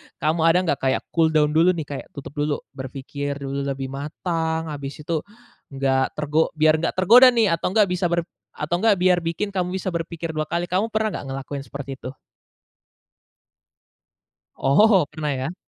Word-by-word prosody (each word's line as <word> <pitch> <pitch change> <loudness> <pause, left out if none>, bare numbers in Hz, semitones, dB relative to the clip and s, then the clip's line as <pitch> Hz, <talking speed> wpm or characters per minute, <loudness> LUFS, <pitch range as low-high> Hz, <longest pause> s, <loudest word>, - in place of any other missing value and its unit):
kamu 155 +2 0
ada 165 +2 +5
nggak 160 -6 0
kayak 130 0 0
cooldown 160 -2 +3
dulu 170 +4 +4
nih, 160 - -3
kayak 140 - -6
tutup 140 - -8
dulu, 145 0 +1 0.2
berpikir 140 +1 -5
dulu 140 0 -4
lebih 135 -1 -4
matang, 160 +3 -3
habis 140 -1 -6
itu 160 +1 -1 0.5
nggak 135 -1 0
tergo 150 +2 0
biar 155 0 +4
nggak 165 - -1
tergoda 225 +8 +7
nih, 225 -5 +3
atau 165 - 0
nggak 210 -2 +5
bisa 180 0 +1
atau 170 - 0
nggak 170 - 0
ber 105 - -14
atau 155 +3 0
nggak 220 0 +4
biar 180 -1 +3
bikin 170 +5 -3
kamu 180 -1 -2
bisa 190 0 -3
berpikir 165 -1 -4
dua 155 -1 -3
kali, 170 +2 -2
kamu 190 +5 +1
pernah 220 -1 0
nggak - - -9
ngelakuin 135 +1 -6
seperti 140 -1 -7
itu? 130 +2 -8 2.4
Oh, 185 +5 +4
pernah 150 -1 -3
ya. 135 +6 -3
155 Hz, 175 wpm, -23 LUFS, 140-175 Hz, 2.4 s, tergoda